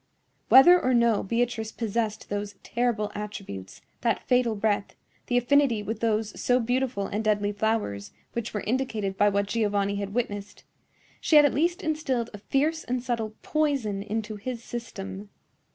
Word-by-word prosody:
Whether 350 +7 +8
or 255 0 +2
no 235 -3 +3
Beatrice 230 +1 -1
possessed 220 -1 -2
those 205 0 -3
terrible 235 -3 -1
attributes, 195 - -7 0.2
that 230 -1 0
fatal 250 -3 +3
breath, 205 -1 -1 0.3
the 245 - +2
affinity 245 -3 +3
with 220 +1 -4
those 220 -2 -1
so 250 0 +3
beautiful 245 -3 0
and 210 +3 -3
deadly 205 -1 +1
flowers 205 - -1 0.2
which 235 -1 -3
were 210 - -3
indicated 220 -4 -1
by 205 +1 +4
what 200 0 +1
Giovanni 205 -2 0
had 200 +1 -4
witnessed, 205 -4 -3 0.6
she 315 - +2
had 295 -1 +9
at 285 - +2
least 345 +7 0
instilled 270 -7 -1
a 205 - -8
fierce 305 +9 0
and 250 0 -2
subtle 225 -4 -2
poison 275 -10 0
into 215 +1 -4
his 235 +2 -5
system. 200 -4 -7
225 Hz, 155 wpm, -26 LUFS, 205-245 Hz, 0.6 s, had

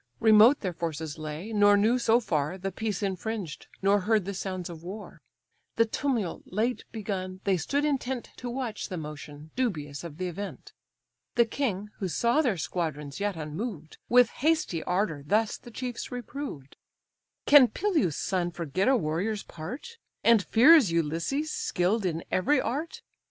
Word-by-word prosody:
Remote 225 +4 +6
their 185 -4 -2
forces 160 -1 -4
lay, 155 +8 -6
nor 205 -1 +6
knew 225 +5 +3
so 230 0 +4
far 155 -5 -1
The 195 +1 -4
peace 210 0 -3
infringed, 195 -3 -4 0.2
nor 200 +1 +4
heard 210 0 +1
the 200 - -3
sounds 185 -2 -4
of 165 -2 -9
war; 200 +5 -9 0.5
The 230 - +4
tumult 225 -6 -2
late 225 +6 -1
begun, 190 -4 -4
they 195 -2 +2
stood 280 - 0
intent 265 -4 -2
To 245 - -5
watch 240 -4 -4
the 185 - -4
motion, 150 0 -8
dubious 155 - -2
of 160 -3 -8
the 185 - -3
event. 180 -4 -6 0.6
The 235 -1 +5
king, 210 -5 -2
who 195 - -1
saw 235 - +2
their 240 - +1
squadrons 150 -4 -3
yet 205 -1 -1
unmoved, 160 +1 -6
With 245 -1 +6
hasty 310 - 0
ardour 180 -5 0
thus 210 +8 +1
the - - -12
chiefs 245 0 -5
reproved: 245 - -7 0.7
"Can 285 -4 +8
Peleus' 315 - 0
son 180 -2 0
forget 170 +1 -2
a 265 0 +5
warrior's 195 +5 -1
part. 265 - -8 0.2
And 230 -3 +6
fears 255 - +6
Ulysses, 170 - -1
skill'd 190 +3 0
in 165 -1 -3
every 275 +10 +3
art? 295 +6 -3
200 Hz, 155 wpm, -28 LUFS, 170-240 Hz, 0.7 s, Can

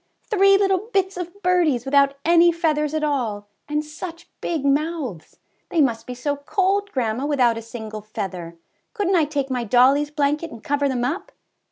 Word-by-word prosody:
Three 395 -1 +5
little 390 +1 +1
bits 385 -2 +1
of 360 +3 -7
birdies 335 -9 +2
without 280 0 +3
any 340 +1 +6
feathers 310 -3 0
at 310 - -1
all, 235 -9 -1 0.2
and 300 +1 -1
such 330 +3 -8
big 315 -5 -2
mouths! 280 - -1 0.3
They 335 - 0
must 235 -6 +1
be 250 - -5
so 285 +3 -2
cold, 390 +7 0
grandma, 245 +1 -1
without 250 -6 +3
a 230 - -5
single 220 -2 -7
feather; 185 -5 -6 0.4
couldnT 395 -3 +1
I 325 -3 +4
take 280 -2 -3
my 250 -2 -1
dollie's 260 +6 +4
blanket 295 +2 0
and 230 -6 -12
cover 285 0 0
them 250 -2 -1
up? 325 +10 -3
290 Hz, 175 wpm, -22 LUFS, 245-340 Hz, 0.4 s, any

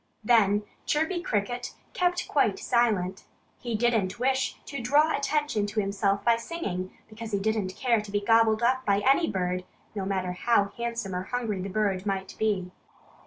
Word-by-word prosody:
Then 210 -2 +4 0.2
Chirpy 320 +4 0
Cricket 245 - -2 0.2
kept 355 0 0
quite 220 -9 +2
silent. 210 -7 0 0.3
He 240 -2 -3
didn't 215 -4 +1
wish 260 +1 0
to 280 -3 -5
draw 295 +6 +3
attention 280 -7 0
to 210 +1 -2
himself 200 0 0
by 235 -1 +5
singing, 205 - -5
because 220 0 -8
he 200 - +2
didn't 200 -2 -1
care 235 -4 +2
to 210 -1 -10
be 205 - +1
gobbled 225 +1 +3
up 260 +2 +2
by 200 -4 +2
any 275 +7 +3
bird, 180 -1 -1 0.3
no 200 -3 -3
matter 185 -2 -1
how 200 +2 +2
handsome 235 -5 -3
or 180 +1 -3
hungry 225 -6 -2
the 195 - -4
bird 200 -1 -1
might 190 -1 -2
be. 200 -5 0
215 Hz, 165 wpm, -27 LUFS, 195-245 Hz, 0.3 s, by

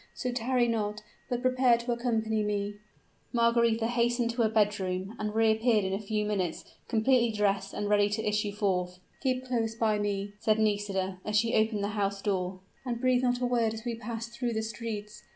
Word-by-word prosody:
So 250 - -2
tarry 245 0 +1
not, 210 -2 -2 0.3
but 245 0 -2
prepare 255 -2 +4
to 235 +1 -3
accompany 225 -2 0
me." 205 0 -2 0.5
Margaretha 235 -1 +3
hastened 240 0 +1
to 235 +1 -1
her 220 - +3
bedroom, 205 -2 0
and 210 0 -3
reappeared 220 -1 +3
in 190 - -1
a 195 - -1
few 210 0 -1
minutes, 190 -5 -2 0.2
completely 235 +1 +3
dressed 200 -2 0
and 205 - -3
ready 205 0 +3
to 215 +1 -2
issue 210 0 0
forth. 185 -3 -1 0.2
"Keep 255 -2 0
close 230 -3 -1
by 220 -2 +1
me," 200 0 -2
said 215 0 +2
Nisida, 200 -3 0
as 210 0 0
she 230 +2 +2
opened 215 -1 +2
the 200 - 0
house 200 -2 -1
door; 185 -2 -2 0.2
"and 240 -3 -3
breathe 255 0 +3
not 245 -1 +1
a - - +2
word 235 -3 +1
as 220 +2 -9
we 240 - -1
pass 230 0 -5
through 235 0 -3
the 220 0 -1
streets. 220 -2 -6
220 Hz, 190 wpm, -29 LUFS, 205-235 Hz, 0.5 s, prepare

